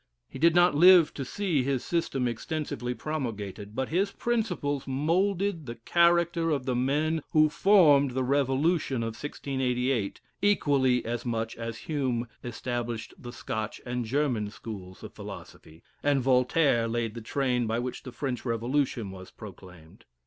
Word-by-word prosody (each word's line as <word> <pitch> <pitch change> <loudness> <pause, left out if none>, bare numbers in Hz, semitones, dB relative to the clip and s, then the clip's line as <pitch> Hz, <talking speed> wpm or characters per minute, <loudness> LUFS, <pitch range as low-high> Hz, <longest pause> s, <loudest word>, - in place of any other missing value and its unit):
He - - -10
did 165 +2 +4
not 175 +1 +5
live 175 +1 +7
to 140 - -4
see 175 +1 -1
his 130 -1 -1
system 140 -7 0
extensively 125 0 -3
promulgated; 110 -8 -5
but 130 0 -2
his 195 +5 +1
principles 180 - -2
moulded 170 +4 0
the 115 - -5
character 170 +5 +2
of 140 -5 -1
the 130 - 0
men 150 +6 +1
who 155 -1 +5
formed 150 -7 +5
the 130 - +1
revolution 135 0 +1
of 115 - -1
1688, 125 -4 -2 0.2
equally 140 - +2
as 120 +1 -3
much 115 -2 -2
as 115 -1 -5
Hume 130 -6 -1 0.2
established 120 -1 -4
the 120 - -10
Scotch 110 -2 -4
and 125 0 -2
German 120 -4 0
schools 95 -4 -9
of - - -9
philosophy; 80 +1 -11 0.2
and 145 -1 +2
Voltaire 125 -1 +3
laid 115 -1 -2
the 115 - -7
train 125 0 0
by 110 +1 0
which 125 +1 -4
the 130 - -9
French 130 -1 -4
Revolution 120 -2 -1
was 95 0 -10
proclaimed. 90 -5 -13
130 Hz, 150 wpm, -28 LUFS, 115-155 Hz, 0.2 s, live